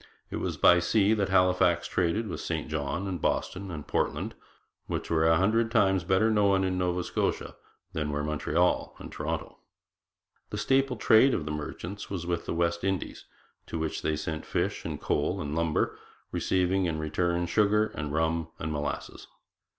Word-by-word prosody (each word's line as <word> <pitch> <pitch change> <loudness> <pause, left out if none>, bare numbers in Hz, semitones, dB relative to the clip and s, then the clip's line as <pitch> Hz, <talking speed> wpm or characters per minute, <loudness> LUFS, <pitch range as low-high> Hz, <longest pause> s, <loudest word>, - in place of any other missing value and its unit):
It - - -3
was - - -3
by 90 - +6
sea 100 +4 +3
that 100 -3 0
Halifax 90 -2 +3
traded 95 +6 0
with 90 - -5
St 80 -3 -3
John 75 +5 -2
and 90 -4 -4
Boston 95 +1 -1
and 75 -4 -6
Portland, - - -1 0.5
which - - -4
were 80 0 +3
a 80 0 +5
hundred 110 +5 +2
times 95 -5 +3
better 95 +5 +3
known 100 -2 +3
in 95 -1 0
Nova 90 0 0
Scotia - - -2 0.4
than 75 -3 -2
were 75 0 -2
Montreal 75 +4 0
and - - -9
Toronto. - - -4 0.9
The - - -4
staple 135 -2 +2
trade 120 +5 +5
of 75 - -3
the 75 - -3
merchants 85 +6 -6
was 90 -4 -4
with 85 -1 -2
the - - -1
West 85 0 0
Indies, 95 -2 -2 0.4
to - - -4
which 80 -1 -2
they 80 - 0
sent 80 +1 -4
fish - - -2
and - - -4
coal - - 0
and 75 0 -4
lumber, 80 -2 0 0.3
receiving 95 +1 +1
in 80 -2 -1
return 85 +3 0
sugar 105 +4 +2
and 75 -1 -4
rum 80 +1 0
and 80 - -4
molasses. 75 -1 -4
90 Hz, 175 wpm, -28 LUFS, 80-95 Hz, 0.9 s, by